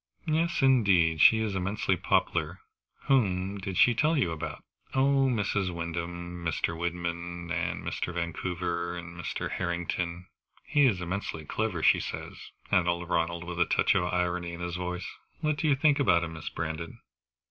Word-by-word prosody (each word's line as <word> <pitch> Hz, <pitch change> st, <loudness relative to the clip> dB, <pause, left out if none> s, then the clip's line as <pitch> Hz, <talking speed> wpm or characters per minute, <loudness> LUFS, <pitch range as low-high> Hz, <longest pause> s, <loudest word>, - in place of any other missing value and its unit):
"Yes 165 Hz, -1 st, +1 dB
indeed, 95 Hz, -, +4 dB
she 110 Hz, -, +8 dB
is 110 Hz, -2 st, -1 dB
immensely 95 Hz, +1 st, 0 dB
popular. 85 Hz, 0 st, 0 dB, 0.4 s
Whom 100 Hz, -6 st, +1 dB
did 95 Hz, -1 st, -4 dB
she 120 Hz, -, +6 dB
tell 150 Hz, +7 st, +2 dB
you 85 Hz, -11 st, +1 dB
about?" 80 Hz, -1 st, -5 dB, 0.3 s
"Oh 135 Hz, 0 st, +4 dB
Mrs. 105 Hz, -5 st, 0 dB
Wyndham, 85 Hz, +1 st, -5 dB
and -, -, -1 dB
Mr. 85 Hz, 0 st, -1 dB
Wyndham, 85 Hz, 0 st, -4 dB
and -, -, -2 dB
Mr. -, -, -3 dB
Vancouver, 85 Hz, 0 st, -3 dB
and 85 Hz, 0 st, -8 dB
Mr. 85 Hz, -2 st, -4 dB
Harrington. 85 Hz, 0 st, -2 dB, 0.4 s
He 145 Hz, -2 st, +4 dB
is 95 Hz, -7 st, 0 dB
immensely 90 Hz, -3 st, -4 dB
clever, 95 Hz, -1 st, -2 dB
she -, -, +5 dB
says," -, -, -5 dB, 0.4 s
added 90 Hz, -1 st, +3 dB
Ronald, 85 Hz, 0 st, -1 dB
with 90 Hz, 0 st, -6 dB
a -, -, +5 dB
touch -, -, +3 dB
of 90 Hz, -, +1 dB
irony 90 Hz, -1 st, -1 dB
in 85 Hz, -, -7 dB
his 85 Hz, -1 st, -3 dB
voice. 90 Hz, 0 st, -4 dB, 0.4 s
"What 155 Hz, -2 st, +1 dB
do 160 Hz, -, 0 dB
you 145 Hz, -, +4 dB
think 145 Hz, +1 st, +3 dB
about 85 Hz, -11 st, +4 dB
him, 80 Hz, -1 st, -5 dB
Miss 80 Hz, -, -6 dB
Brandon?" 80 Hz, 0 st, -5 dB
90 Hz, 165 wpm, -29 LUFS, 85-105 Hz, 0.4 s, she